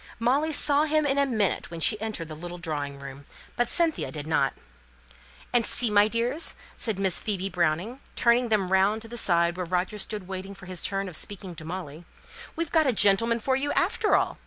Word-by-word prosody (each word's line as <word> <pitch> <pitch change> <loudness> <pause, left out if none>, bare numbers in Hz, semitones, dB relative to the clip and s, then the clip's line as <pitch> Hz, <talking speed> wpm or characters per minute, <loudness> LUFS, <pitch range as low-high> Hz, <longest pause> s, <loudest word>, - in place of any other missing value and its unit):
Molly 270 +7 +1
saw 295 0 +4
him 310 0 +1
in 280 0 +1
a 280 - +3
minute 215 -7 0
when 170 0 -7
she 210 +7 +4
entered 215 -7 -4
the 155 - -8
little 175 +3 -7
drawing 145 -5 -4
room; 140 0 -10 0.3
but 240 - 0
Cynthia 335 -2 +1
did 150 -2 -6
not. 155 -4 +1 1.0
"And 240 -1 +4
see, 235 0 +1
my 205 0 +5
dears," 240 +8 0 0.2
said 220 -5 -1
Miss 190 -3 +1
Phoebe 195 -2 -2
Browning, 180 - -1 0.2
turning 235 0 +3
them 195 -4 +1
round 200 +3 +2
to - - -10
the 235 - -8
side 170 -5 +2
where 180 - -2
Roger 180 +4 -1
stood 205 -2 -4
waiting 190 +1 -6
for 195 - -13
his 185 -1 -6
turn 195 0 -2
of 180 - -8
speaking 190 +1 -3
to 160 -1 -10
Molly, 165 -2 -7 0.5
"we've 335 -2 -3
got 315 -3 +3
a 260 - +3
gentleman 230 +3 +3
for 260 +4 0
you 285 +2 -1
after 425 - +2
all! - - 0
200 Hz, 205 wpm, -26 LUFS, 175-240 Hz, 1.0 s, my